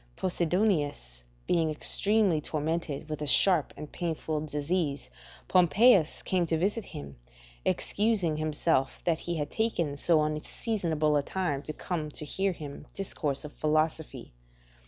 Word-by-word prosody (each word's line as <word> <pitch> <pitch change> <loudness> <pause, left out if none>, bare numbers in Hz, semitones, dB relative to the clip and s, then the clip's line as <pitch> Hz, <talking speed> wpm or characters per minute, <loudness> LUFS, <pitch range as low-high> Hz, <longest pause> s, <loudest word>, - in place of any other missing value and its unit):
Posidonius 160 - 0 0.2
being 165 -2 +2
extremely 195 +2 +2
tormented 155 -1 -3
with 155 -1 -5
a 150 - -2
sharp 170 +2 +4
and 150 0 -8
painful 160 -3 -2
disease, 150 0 -2 0.4
Pompeius 185 +1 +4
came 180 -2 +1
to 160 - +1
visit 205 +5 0
him, 70 -2 -9 0.5
excusing 200 -7 +1
himself 155 -3 0
that 165 -2 +1
he 175 - -3
had 145 -1 -3
taken 175 -10 0
so 155 +1 +3
unseasonable 155 0 -1
a - - +2
time 145 -3 -2
to 155 - -5
come 155 -1 -4
to 150 - -5
hear 190 +6 0
him 150 -5 -9
discourse 150 -8 -3
of 150 - -9
philosophy. 155 - -1
155 Hz, 135 wpm, -29 LUFS, 150-180 Hz, 0.5 s, sharp